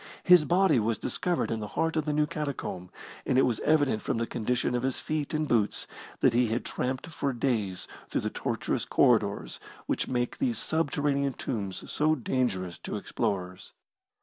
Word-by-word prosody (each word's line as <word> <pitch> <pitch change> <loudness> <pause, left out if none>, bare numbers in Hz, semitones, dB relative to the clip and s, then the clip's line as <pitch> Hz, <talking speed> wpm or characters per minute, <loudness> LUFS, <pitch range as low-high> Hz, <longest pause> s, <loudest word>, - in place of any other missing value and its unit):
His 180 -4 +7
body 175 -6 +4
was 110 0 0
discovered 175 - -1
in 115 - -1
the 105 - -4
heart 165 0 +1
of 155 -2 0
the 150 - 0
new 150 0 +2
catacomb, 140 -12 -4 0.3
and 130 - +1
it 135 - +6
was 120 -3 +1
evident 145 -8 +2
from - - -1
the 115 - 0
condition 125 +2 -1
of 120 - 0
his 130 0 -1
feet 155 -2 -2
and 155 -1 0
boots 110 -6 +1 0.4
that - - +5
he 120 0 +3
had 115 +3 -2
tramped 130 +1 -2
for 140 -3 -2
days 110 -7 -1 0.2
through - - 0
the - - -2
tortuous - - -2
corridors - - +2 0.3
which - - -1
make 120 -1 -1
these 250 -4 +1
subterranean 145 -3 0
tombs 100 -7 -4
so 155 +1 +2
dangerous 110 - -1
to - - -5
explorers. 90 -5 -3
130 Hz, 175 wpm, -28 LUFS, 110-150 Hz, 0.4 s, His